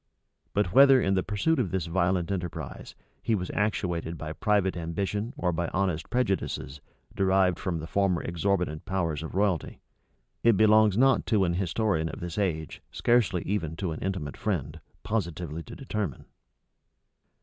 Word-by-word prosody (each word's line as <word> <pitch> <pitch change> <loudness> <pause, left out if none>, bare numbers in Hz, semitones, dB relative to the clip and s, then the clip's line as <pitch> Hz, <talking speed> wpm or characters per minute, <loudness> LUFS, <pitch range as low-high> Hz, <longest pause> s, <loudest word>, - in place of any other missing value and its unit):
But 100 -3 +1
whether, 135 -1 +8
in 95 -5 +1
the 95 - +2
pursuit 105 - 0
of 110 -8 0
this 90 -2 -1
violent 90 +1 0
enterprise, 80 -8 -5 0.3
he 115 - +1
was 90 -3 -3
actuated 85 -5 -1
by 80 0 -5
private 100 0 +1
ambition 100 +6 -2
or 90 - 0
by 85 +1 -1
honest 95 -4 -1
prejudices, 95 - -1 0.3
derived 95 -1 +2
from 95 -4 -2
the 80 - -5
former 95 0 +1
exorbitant 85 -2 -1
powers 85 -6 -1
of 80 +1 -7
royalty, 95 -4 0 0.6
it 115 -4 +4
belongs 110 -1 +5
not 135 +1 +4
to 105 -4 +3
an 85 - 0
historian 90 -2 0
of - - -7
this 85 +3 -4
age, 80 -6 -2
scarcely 120 -7 +2
even 85 -5 -2
to 90 -1 -3
an 80 - -5
intimate 95 -7 -3
friend, 80 -6 -2 0.2
positively 85 -6 -3
to - - -10
determine. 105 - -4
95 Hz, 155 wpm, -28 LUFS, 85-105 Hz, 0.6 s, whether